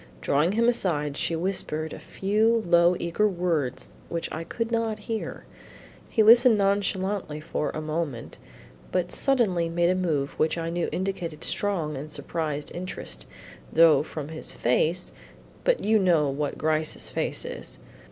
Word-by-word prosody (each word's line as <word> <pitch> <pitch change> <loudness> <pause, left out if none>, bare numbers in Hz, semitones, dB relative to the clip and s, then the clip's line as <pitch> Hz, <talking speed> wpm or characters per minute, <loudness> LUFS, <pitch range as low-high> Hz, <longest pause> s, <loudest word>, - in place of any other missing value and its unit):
Drawing 150 +7 +1
him 230 +2 +2
aside, 155 -11 0
she 165 - 0
whispered 160 -3 -2
a - - -8
few 220 +3 +1
low 170 +1 +5
eager 170 +5 +1
words 170 - -1 0.2
which 170 -1 -3
I 160 - -4
could 230 +7 -4
not 225 -2 0
hear. 225 -1 -4 0.6
He 220 - +3
listened 235 +1 +7
nonchalantly 195 -4 0
for 155 -1 -2
a 155 - -4
moment 155 -6 -4 0.5
but 180 -1 0
suddenly 200 -11 +2
made 170 +1 +2
a - - +3
move 155 -7 0
which 155 +2 +2
I 165 0 -3
knew 175 0 -1
indicated 180 -4 -3
strong 175 -7 -1
and 145 +3 -6
surprised 150 -2 -4
interest, 175 - -6 0.4
though 165 -2 +6
from 150 -1 -6
his 160 0 -4
face 160 +9 +1 0.5
but - - +2
you 220 +1 +4
know 165 -7 +3
what 145 +1 -3
Gryce's 155 0 0
face - - -2
is. - - -7
170 Hz, 150 wpm, -26 LUFS, 155-200 Hz, 0.6 s, listened